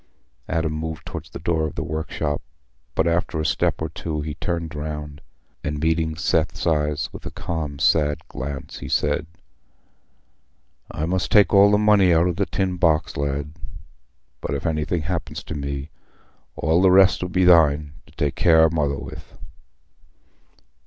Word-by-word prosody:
Adam 80 Hz, -1 st, 0 dB
moved 80 Hz, 0 st, -5 dB
towards -, -, -7 dB
the -, -, -8 dB
door 80 Hz, -2 st, 0 dB
of 75 Hz, -, -8 dB
the -, -, -2 dB
workshop, 80 Hz, -1 st, -3 dB, 0.5 s
but 80 Hz, -, +2 dB
after 85 Hz, -1 st, 0 dB
a 80 Hz, -, -1 dB
step -, -, +1 dB
or -, -, 0 dB
two 75 Hz, -2 st, -4 dB
he 75 Hz, 0 st, -4 dB
turned 85 Hz, 0 st, -3 dB
round, 75 Hz, -1 st, -6 dB, 0.4 s
and, 75 Hz, 0 st, -3 dB
meeting 80 Hz, 0 st, 0 dB
Seth's 85 Hz, -1 st, 0 dB
eyes 75 Hz, -2 st, +1 dB
with -, -, -9 dB
a -, -, -3 dB
calm 75 Hz, -4 st, -4 dB
sad 75 Hz, +1 st, +2 dB
glance, 70 Hz, +1 st, -6 dB
he -, -, -7 dB
said, 75 Hz, +1 st, 0 dB, 1.6 s
"I 75 Hz, -, -3 dB
must 90 Hz, +2 st, -1 dB
take 105 Hz, -1 st, +5 dB
all 100 Hz, 0 st, +7 dB
the 105 Hz, -, +4 dB
money 105 Hz, -3 st, +4 dB
out 85 Hz, 0 st, +4 dB
o' 90 Hz, -, +1 dB
the 100 Hz, +3 st, -1 dB
tin 95 Hz, -1 st, -1 dB
box, 80 Hz, -3 st, +2 dB
lad; 70 Hz, +1 st, -2 dB, 0.9 s
but -, -, -3 dB
if -, -, -5 dB
anything 80 Hz, +1 st, -1 dB
happens 85 Hz, +2 st, -4 dB
to -, -, -6 dB
me, 70 Hz, 0 st, -5 dB, 0.6 s
all 80 Hz, +4 st, +2 dB
the 95 Hz, -, +6 dB
rest 95 Hz, +1 st, +5 dB
'll 90 Hz, -, -1 dB
be 90 Hz, +1 st, +2 dB
thine, 75 Hz, -4 st, +4 dB
to -, -, -19 dB
take 75 Hz, -3 st, -1 dB
care 80 Hz, -2 st, +5 dB
o' 80 Hz, -, +5 dB
Mother 75 Hz, -4 st, 0 dB
with." 70 Hz, -2 st, -10 dB
80 Hz, 165 wpm, -23 LUFS, 75-85 Hz, 1.6 s, all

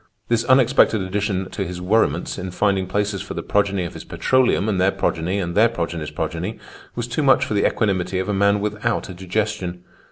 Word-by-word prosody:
This 115 Hz, -1 st, +2 dB
unexpected 130 Hz, -3 st, +4 dB
addition 95 Hz, 0 st, -2 dB
to 100 Hz, -, -3 dB
his 90 Hz, -1 st, -6 dB
worriments 105 Hz, +5 st, +1 dB
in 95 Hz, -, -4 dB
finding 95 Hz, 0 st, 0 dB
places 100 Hz, 0 st, -1 dB
for -, -, -7 dB
the -, -, -4 dB
progeny 100 Hz, -2 st, +1 dB
of 85 Hz, -, -5 dB
his -, -, -8 dB
petroleum 130 Hz, -6 st, +1 dB
and 95 Hz, -4 st, +1 dB
their 95 Hz, -, +4 dB
progeny 85 Hz, +2 st, -1 dB
and 85 Hz, -3 st, -2 dB
their 110 Hz, +5 st, +5 dB
progeny's 85 Hz, -7 st, -4 dB
progeny 90 Hz, +7 st, -4 dB, 0.4 s
was 120 Hz, 0 st, -3 dB
too 125 Hz, +6 st, -2 dB
much 135 Hz, -2 st, +4 dB
for 110 Hz, -, -3 dB
the 100 Hz, -, +3 dB
equanimity 95 Hz, -3 st, 0 dB
of 95 Hz, -, -2 dB
a 105 Hz, -, 0 dB
man 100 Hz, +1 st, +2 dB
without 105 Hz, +2 st, -2 dB
a -, -, -6 dB
digestion. 95 Hz, -1 st, -3 dB
100 Hz, 200 wpm, -21 LUFS, 90-110 Hz, 0.4 s, their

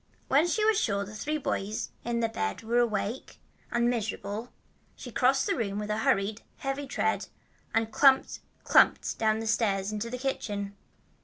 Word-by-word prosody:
When 290 Hz, +6 st, +4 dB
she 425 Hz, +4 st, +1 dB
was 435 Hz, -3 st, +4 dB
sure 200 Hz, -2 st, 0 dB
the 205 Hz, -, -10 dB
three 300 Hz, +8 st, -2 dB
boys 210 Hz, -7 st, -3 dB
in 235 Hz, 0 st, -1 dB
the 230 Hz, -, +2 dB
bed 95 Hz, -, -3 dB
were 235 Hz, +2 st, +2 dB
awake 230 Hz, +1 st, -1 dB, 0.3 s
and 235 Hz, 0 st, +2 dB
miserable, 220 Hz, -1 st, -3 dB, 0.4 s
she 245 Hz, -, -9 dB
crossed 265 Hz, +3 st, +3 dB
the -, -, +1 dB
room 205 Hz, -4 st, -2 dB
with 210 Hz, 0 st, -3 dB
a 210 Hz, -, 0 dB
hurried, 210 Hz, 0 st, +1 dB, 0.2 s
heavy 275 Hz, +1 st, -3 dB
tread -, -, 0 dB, 0.4 s
and 225 Hz, 0 st, 0 dB
clumped, 270 Hz, +1 st, +4 dB, 0.2 s
clumped -, -, +4 dB
down 220 Hz, -1 st, +2 dB
the -, -, -4 dB
stairs 205 Hz, -3 st, +1 dB
into 215 Hz, +2 st, -3 dB
the 250 Hz, -, -4 dB
kitchen. 205 Hz, -6 st, -3 dB
225 Hz, 170 wpm, -29 LUFS, 210-255 Hz, 0.4 s, When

